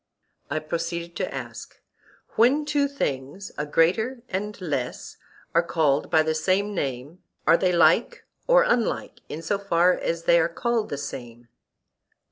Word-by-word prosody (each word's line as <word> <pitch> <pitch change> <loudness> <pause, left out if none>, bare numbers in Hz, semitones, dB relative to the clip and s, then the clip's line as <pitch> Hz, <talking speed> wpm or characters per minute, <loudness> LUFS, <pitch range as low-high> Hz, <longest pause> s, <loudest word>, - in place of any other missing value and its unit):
I 155 - -1
proceeded 170 +2 -4
to - - -2
ask: - - -8 0.5
When 270 +6 +3
two 290 -1 +1
things, 145 - -4
a 150 - -3
greater 220 - +1
and 205 +3 -4
less, 145 -9 -4 0.4
are 170 - +5
called 155 -4 +1
by 155 - +4
the 160 0 0
same 190 +6 0
name, 140 0 -4 0.3
are - - +6
they 180 +1 +2
like 180 - +3 0.2
or - - +6
unlike 245 - 0
in 160 +2 -6
so 195 +5 -1
far 180 -2 +3
as 165 -1 -3
they 170 - +5
are 165 - +2
called 230 +5 -1
the 145 - -3
same? 120 -4 -8
170 Hz, 150 wpm, -25 LUFS, 155-210 Hz, 0.5 s, are